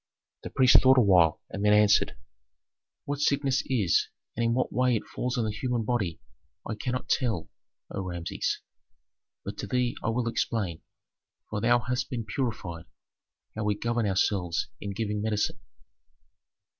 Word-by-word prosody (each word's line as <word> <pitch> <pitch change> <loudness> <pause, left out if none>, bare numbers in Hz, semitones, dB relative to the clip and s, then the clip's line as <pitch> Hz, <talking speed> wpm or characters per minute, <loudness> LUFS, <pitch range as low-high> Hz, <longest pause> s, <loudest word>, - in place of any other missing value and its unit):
The - - -6
priest 130 -2 +6
thought 130 0 +6
awhile 90 -9 +5
and 100 - -4
then 105 0 +5
answered, 105 0 +4 0.9
"What 145 0 -3
sickness 140 -2 +2
is 105 - +2 0.3
and 115 - -1
in 115 0 +2
what 130 - 0
way 125 -1 +3
it 110 - -2
falls 125 0 -3
on 115 - +1
the 110 - -1
human 120 +2 -1
body, 105 -9 -1 0.5
I - - -2
cannot 125 +4 -3
tell, 115 - 0 0.4
O - - -3
Rameses. 85 -2 -3 0.8
But - - -6
to - - -4
thee 125 +1 0
I - - +1
will 115 +1 0
explain, 100 -7 -1 0.7
for 105 -1 -2
thou 120 +1 +5
hast 125 0 -2
been 115 -4 -3
purified, 105 - -3 0.7
how 110 - -3
we 105 0 +1
govern 115 +1 -1
ourselves 95 -2 0
in 100 - -5
giving 105 0 -2
medicine. 105 -1 -1
115 Hz, 155 wpm, -28 LUFS, 100-125 Hz, 0.9 s, priest